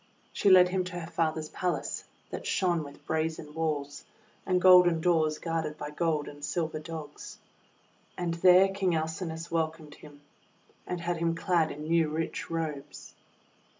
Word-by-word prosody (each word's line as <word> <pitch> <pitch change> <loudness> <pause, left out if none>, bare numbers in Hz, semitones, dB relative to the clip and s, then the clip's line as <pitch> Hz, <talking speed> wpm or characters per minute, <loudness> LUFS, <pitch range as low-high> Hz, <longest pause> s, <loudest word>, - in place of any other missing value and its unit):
She 200 - +2
led 180 -1 +7
him 185 0 0
to 180 -1 -5
her 165 0 -8
father's 155 -2 -1
palace, 170 -6 -3 0.3
that - - -5
shone 175 -4 +1
with 140 -1 -13
brazen 160 -1 -2
walls, 150 -3 -3 0.4
and 185 -1 +2
golden 180 -2 +7
doors 160 -2 +2
guarded 160 -2 -3
by 150 0 -6
gold 155 -1 -1
and 145 0 -11
silver 160 0 -2
Dogs. 155 -2 -8 0.8
And 175 -2 -1
there 180 +3 +6
King 195 -3 0
Alcinous 160 +1 -4
welcomed 160 -2 -2
him, 145 -1 -15 0.7
and 180 -1 -3
had 175 0 -2
him 165 0 0
clad 165 -1 +1
in 150 - -7
new 165 0 +2
rich 160 +1 -3
robes. 160 -4 -5
165 Hz, 150 wpm, -29 LUFS, 155-175 Hz, 0.8 s, led